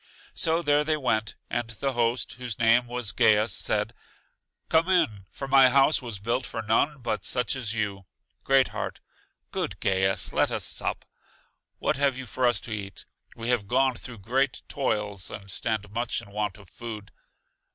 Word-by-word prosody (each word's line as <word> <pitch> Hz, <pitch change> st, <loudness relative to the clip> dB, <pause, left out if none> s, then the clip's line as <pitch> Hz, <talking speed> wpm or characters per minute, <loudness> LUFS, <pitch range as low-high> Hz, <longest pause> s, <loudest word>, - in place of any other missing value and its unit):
So 165 Hz, +1 st, +2 dB
there 145 Hz, -1 st, +3 dB
they 155 Hz, 0 st, +1 dB
went, 110 Hz, -6 st, 0 dB
and 120 Hz, -1 st, -2 dB
the 135 Hz, +4 st, -2 dB
host, 120 Hz, 0 st, 0 dB
whose 125 Hz, -3 st, -6 dB
name 120 Hz, +1 st, +4 dB
was 120 Hz, -4 st, -2 dB
Gaius, 105 Hz, +1 st, +4 dB
said: -, -, -1 dB, 0.7 s
Come 165 Hz, +3 st, +3 dB
in, 135 Hz, -, +2 dB
for 135 Hz, -, -6 dB
my 135 Hz, -1 st, +7 dB
house 140 Hz, +3 st, +4 dB
was 115 Hz, -5 st, -5 dB
built 115 Hz, +6 st, -1 dB
for 115 Hz, -2 st, -5 dB
none 125 Hz, +7 st, +2 dB
but 105 Hz, -5 st, -2 dB
such 125 Hz, +4 st, -1 dB
as 115 Hz, -4 st, -2 dB
you. 100 Hz, -3 st, -3 dB, 0.4 s
Great 135 Hz, -1 st, +4 dB
heart: -, -, -5 dB, 0.5 s
Good -, -, -3 dB
Gaius, 95 Hz, 0 st, +2 dB
let -, -, +3 dB
us -, -, -1 dB
sup. -, -, -2 dB, 0.7 s
What -, -, 0 dB
have 140 Hz, -2 st, +2 dB
you 130 Hz, -, -6 dB
for 125 Hz, +1 st, 0 dB
us 120 Hz, -4 st, +3 dB
to 115 Hz, -, -9 dB
eat? 100 Hz, -2 st, -5 dB, 0.3 s
We 115 Hz, +1 st, -4 dB
have 120 Hz, -5 st, +1 dB
gone 130 Hz, +3 st, +3 dB
through 120 Hz, 0 st, -9 dB
great 135 Hz, +2 st, 0 dB
toils, 105 Hz, -8 st, -2 dB
and 100 Hz, -2 st, -8 dB
stand 105 Hz, 0 st, -2 dB
much 120 Hz, +2 st, -1 dB
in 100 Hz, -, -12 dB
want 105 Hz, -2 st, -2 dB
of 100 Hz, -2 st, -15 dB
food. 110 Hz, +1 st, -8 dB
120 Hz, 175 wpm, -27 LUFS, 105-130 Hz, 0.7 s, my